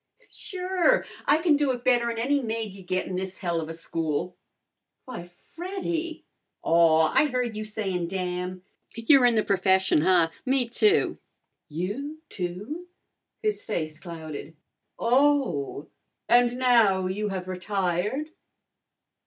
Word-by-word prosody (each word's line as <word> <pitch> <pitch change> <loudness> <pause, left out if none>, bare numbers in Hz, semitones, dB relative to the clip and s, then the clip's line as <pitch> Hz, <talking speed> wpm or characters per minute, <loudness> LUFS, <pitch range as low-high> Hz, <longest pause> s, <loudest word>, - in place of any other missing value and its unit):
"Sure! 375 +5 +1 0.2
I 290 - +5
kin 320 -2 +3
do 290 -1 +1
it 245 -1 -7
better'n 240 -2 +2
any 275 +5 +1
maid 225 -3 -3
you'd 190 -2 -13
get 185 0 0
in 185 - -5
this 190 0 -4
helluva 165 -3 -2
school." 165 +1 -3 0.7
"Why, 255 -7 -6
Freddy!" 335 - -5 0.4
"Aw, 160 -1 +4
I - - +5
heard 250 -4 -2
you 215 - -3
sayin' 195 -5 -3
damn! 180 0 -4 0.3
You're 245 +3 +5
in 240 - +2
the 215 - +3
p'fession, 190 -4 +3
huh? 170 -1 +4
Me, 260 -2 +1
too." 420 - +2 0.5
"You, 205 - -4
too?" 205 - -5 0.6
His 425 -1 0
face 155 -6 -3
clouded. 160 -3 -8 0.4
"Oh! 250 - +1 0.4
And 245 0 +4
now 230 -7 +4
you 205 +3 -2
have 185 -2 -4
retired?" 190 - -2
210 Hz, 125 wpm, -26 LUFS, 180-260 Hz, 0.7 s, I